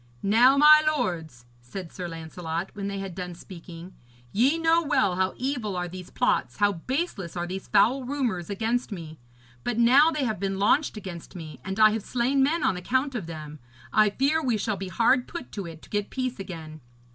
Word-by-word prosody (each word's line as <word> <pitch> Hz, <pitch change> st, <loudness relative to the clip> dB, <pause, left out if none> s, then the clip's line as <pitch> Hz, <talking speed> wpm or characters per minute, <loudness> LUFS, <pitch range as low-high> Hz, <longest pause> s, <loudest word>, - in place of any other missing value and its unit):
'Now, 240 Hz, +7 st, +5 dB
my 305 Hz, +1 st, +8 dB
lords,' 160 Hz, -, -3 dB, 0.2 s
said 165 Hz, +8 st, -8 dB
Sir 180 Hz, -2 st, -6 dB
Lancelot, 165 Hz, +1 st, -5 dB
when 200 Hz, -1 st, -4 dB
they 200 Hz, 0 st, -4 dB
had 195 Hz, -2 st, -5 dB
done 180 Hz, -1 st, -6 dB
speaking, 170 Hz, 0 st, -11 dB, 0.4 s
'ye 265 Hz, +9 st, +3 dB
know 330 Hz, 0 st, +3 dB
well 240 Hz, -, +1 dB
how 185 Hz, +1 st, 0 dB
evil 245 Hz, -7 st, -2 dB
are 180 Hz, 0 st, -2 dB
these 180 Hz, 0 st, -9 dB
plots, 250 Hz, -, 0 dB
how 205 Hz, -1 st, +3 dB
baseless 195 Hz, -, -3 dB
are 175 Hz, -, -1 dB
these 190 Hz, +2 st, -6 dB
foul 240 Hz, +7 st, +3 dB
rumours 245 Hz, -, -2 dB
against 225 Hz, +4 st, -1 dB
me. 160 Hz, -5 st, -8 dB, 0.4 s
But 240 Hz, -, -2 dB
now 260 Hz, +7 st, +6 dB
they 305 Hz, -3 st, -1 dB
have 220 Hz, -6 st, -1 dB
been 195 Hz, 0 st, -2 dB
launched 215 Hz, +6 st, +2 dB
against 185 Hz, -5 st, -8 dB
me, 160 Hz, -3 st, -8 dB
and 190 Hz, +2 st, -4 dB
I 215 Hz, 0 st, +7 dB
have 220 Hz, 0 st, -2 dB
slain 255 Hz, +5 st, 0 dB
men 305 Hz, +4 st, +2 dB
on 185 Hz, -, +2 dB
account 260 Hz, +9 st, 0 dB
of 215 Hz, -9 st, -4 dB
them, 155 Hz, -2 st, -8 dB, 0.3 s
I 215 Hz, -1 st, +5 dB
fear 280 Hz, +9 st, +1 dB
we 250 Hz, -7 st, +1 dB
shall 210 Hz, 0 st, -1 dB
be 195 Hz, 0 st, -6 dB
hard 235 Hz, +7 st, +2 dB
put 335 Hz, -7 st, -8 dB
to 200 Hz, -4 st, -5 dB
it 160 Hz, -1 st, -11 dB
to -, -, -15 dB
get 205 Hz, -1 st, -1 dB
peace 255 Hz, -3 st, -3 dB
again. 160 Hz, -5 st, -8 dB
200 Hz, 200 wpm, -26 LUFS, 175-255 Hz, 0.4 s, my